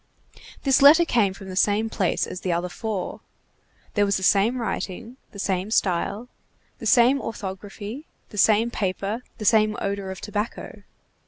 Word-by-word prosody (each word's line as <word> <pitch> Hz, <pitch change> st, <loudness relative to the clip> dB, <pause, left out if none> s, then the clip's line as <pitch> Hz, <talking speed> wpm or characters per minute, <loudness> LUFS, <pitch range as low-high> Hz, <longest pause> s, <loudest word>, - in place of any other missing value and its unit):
This 270 Hz, -1 st, +3 dB
letter 310 Hz, +5 st, +8 dB
came 225 Hz, -, +2 dB
from 195 Hz, 0 st, -11 dB
the 185 Hz, -, -6 dB
same 205 Hz, +3 st, +2 dB
place 195 Hz, -4 st, 0 dB
as 180 Hz, -, -7 dB
the 185 Hz, -, -1 dB
other 175 Hz, +1 st, -1 dB
four. 210 Hz, 0 st, -4 dB, 0.7 s
There 205 Hz, -, +2 dB
was 200 Hz, -1 st, +1 dB
the 190 Hz, -, -5 dB
same 205 Hz, +6 st, +3 dB
writing, 230 Hz, +1 st, -4 dB
the -, -, -13 dB
same 195 Hz, 0 st, -1 dB
style, 200 Hz, +2 st, 0 dB, 0.5 s
the -, -, -4 dB
same 260 Hz, +2 st, +5 dB
orthography, 205 Hz, -, -7 dB, 0.2 s
the 210 Hz, -, -11 dB
same 220 Hz, +3 st, +4 dB
paper, 200 Hz, +2 st, -2 dB, 0.2 s
the 215 Hz, -, -6 dB
same 215 Hz, -1 st, +3 dB
odor 200 Hz, -1 st, -3 dB
of 190 Hz, -, -6 dB
tobacco. 210 Hz, +1 st, -5 dB
205 Hz, 160 wpm, -24 LUFS, 190-230 Hz, 0.7 s, letter